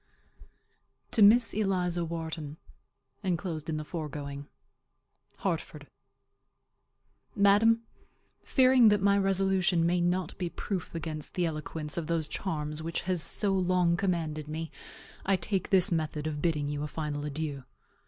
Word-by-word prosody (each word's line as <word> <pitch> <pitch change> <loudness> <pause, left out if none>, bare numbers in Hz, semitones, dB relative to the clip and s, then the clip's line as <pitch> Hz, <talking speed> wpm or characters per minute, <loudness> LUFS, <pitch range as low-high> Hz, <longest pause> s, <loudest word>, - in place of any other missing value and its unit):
TO 225 - +3
MISS 225 +2 +6
ELIZA 180 -4 0
WHARTON. 160 -2 -5 0.6
[Enclosed 170 -4 -3
in 155 - -1
the 155 - -5
foregoing.] 145 -3 -6 0.9
HARTFORD. - - -3 1.5
Madam: 215 +3 +4 0.6
Fearing 255 -3 +5
that 210 0 +3
my 200 0 +5
resolution 190 -3 +2
may 175 +1 +2
not 175 -1 0
be 180 -2 -1
proof 180 -1 -5
against 155 -2 -5
the 180 - +1
eloquence 155 -1 -3
of 165 -3 -2
those 165 -2 0
charms 150 -3 -3
which 165 +1 -3
has 180 -2 -1
so 200 +4 +1
long 180 -2 +2
commanded 165 -5 -2
me, 160 +1 -5 0.5
I 195 - +2
take 185 +1 -2
this 185 -2 +4
method 155 -2 -1
of 150 -2 -3
bidding 150 -3 0
you 145 0 -3
a 150 - -2
final 150 -1 -4
adieu. 145 -2 -4
170 Hz, 135 wpm, -29 LUFS, 155-190 Hz, 1.5 s, MISS